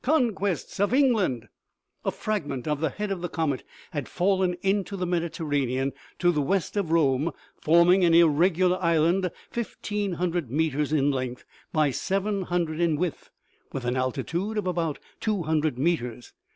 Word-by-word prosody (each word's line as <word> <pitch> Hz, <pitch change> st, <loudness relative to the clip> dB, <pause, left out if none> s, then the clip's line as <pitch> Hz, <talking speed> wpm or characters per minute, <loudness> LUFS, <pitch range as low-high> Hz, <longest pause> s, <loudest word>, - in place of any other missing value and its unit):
Conquests 225 Hz, -, 0 dB
of 205 Hz, +5 st, +2 dB
England 220 Hz, -, +3 dB
7" 110 Hz, -, -23 dB, 0.6 s
A -, -, +2 dB
fragment 150 Hz, -, -3 dB
of 150 Hz, -1 st, 0 dB
the 160 Hz, 0 st, +1 dB
head 210 Hz, +6 st, -4 dB
of 190 Hz, -3 st, -3 dB
the 175 Hz, -, -3 dB
comet 150 Hz, -6 st, -1 dB, 0.3 s
had 145 Hz, -6 st, -4 dB
fallen 185 Hz, -1 st, +1 dB
into 195 Hz, 0 st, 0 dB
the 180 Hz, -, -1 dB
Mediterranean 145 Hz, -6 st, -1 dB, 0.2 s
to 175 Hz, -1 st, +3 dB
the 150 Hz, -3 st, 0 dB
west 190 Hz, +8 st, 0 dB
of 200 Hz, -5 st, 0 dB
Rome, 150 Hz, -2 st, +3 dB, 0.3 s
forming 170 Hz, +4 st, +5 dB
an 170 Hz, -1 st, +5 dB
irregular 175 Hz, +3 st, +4 dB
island, 170 Hz, +2 st, +2 dB, 0.2 s
fifteen 210 Hz, -4 st, -3 dB
hundred 175 Hz, -5 st, -1 dB
meters 150 Hz, +1 st, 0 dB
in 145 Hz, -2 st, +3 dB
length 130 Hz, -2 st, -4 dB, 0.3 s
by 155 Hz, -3 st, +2 dB
seven 195 Hz, +7 st, -1 dB
hundred 170 Hz, -3 st, -1 dB
in 170 Hz, -3 st, +2 dB
width, 170 Hz, 0 st, -3 dB, 0.4 s
with 130 Hz, -2 st, -4 dB
an 125 Hz, +1 st, 0 dB
altitude 170 Hz, -, -2 dB
of 210 Hz, -, -1 dB
about 170 Hz, -4 st, -1 dB, 0.2 s
two 210 Hz, -5 st, -1 dB
hundred 155 Hz, -3 st, 0 dB
meters. 125 Hz, -6 st, -1 dB
170 Hz, 160 wpm, -26 LUFS, 145-190 Hz, 0.6 s, forming